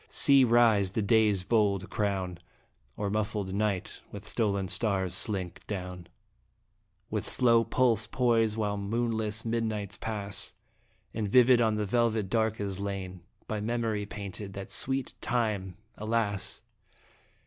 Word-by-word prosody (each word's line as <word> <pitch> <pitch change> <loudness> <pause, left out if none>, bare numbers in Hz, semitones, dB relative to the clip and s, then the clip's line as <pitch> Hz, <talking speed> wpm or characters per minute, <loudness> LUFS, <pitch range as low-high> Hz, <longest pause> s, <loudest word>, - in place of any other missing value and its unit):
See 140 -2 +5
rise 115 -5 +4
the 110 - 0
Day's 105 -3 +3
bold 100 -3 +1
crown, 95 -4 -2 0.6
Or 100 -1 -2
muffled 105 -2 -2
Night 100 -2 -1
with 100 0 -8
stolen 100 -4 0
stars 95 -2 +1
slink 95 -4 -2
down. 90 -3 -5 1.0
With - - -2
slow 115 -2 +4
pulse 115 -2 +2
poise 115 -3 +2
while 105 -2 -1
moonless 110 +1 -1
midnights 110 -3 -2
pass. 105 -2 -3 0.6
And 105 -2 -2
vivid 125 +2 +6
on 110 -2 +2
the 105 0 -1
velvet 110 -2 +1
dark 110 -1 +1
is 100 -2 -2
lain, 95 -2 -5 0.3
By 110 -1 -3
memory 110 -2 -1
painted, 100 -1 -6
that 100 0 -7
sweet 135 0 -1
time 105 -6 -1 0.2
alas 105 -2 -1
105 Hz, 125 wpm, -29 LUFS, 100-115 Hz, 1.0 s, vivid